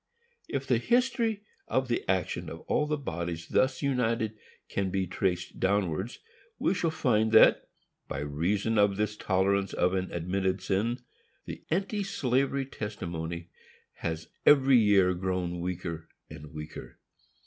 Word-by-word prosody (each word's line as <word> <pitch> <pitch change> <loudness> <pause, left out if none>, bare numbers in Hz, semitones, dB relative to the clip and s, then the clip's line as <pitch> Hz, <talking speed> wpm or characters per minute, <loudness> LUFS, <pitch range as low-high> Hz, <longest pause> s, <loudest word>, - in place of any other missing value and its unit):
If 135 -1 -3
the 125 -4 +2
history 235 - +1 0.2
of 130 0 +1
the 120 - 0
action 95 -1 0
of - - -8
all 150 - 0
the 150 0 0
bodies 85 - -4
thus 130 +2 +2
united 115 -5 0 0.3
can 100 -1 -1
be 95 0 0
traced 90 0 -2
downwards, 95 +2 0 0.4
we - - +1
shall 170 -3 0
find 110 -8 +1
that, 110 - +6 0.4
by 70 - -4
reason 95 +10 0
of 100 -1 +3
this 105 0 0
tolerance 100 0 +1
of 90 +1 +2
an 95 -1 -1
admitted 95 +2 -1
sin, 115 +6 -1 0.4
the - - -7
anti 195 +5 0
slavery 135 -6 0
testimony 85 -8 -5 0.5
has 80 -1 -4
every 135 -3 +6
year 100 -4 +4
grown 90 -1 -2
weaker 85 -2 -4 0.2
and 75 -1 -10
weaker. 75 0 -8
100 Hz, 135 wpm, -29 LUFS, 90-130 Hz, 0.5 s, that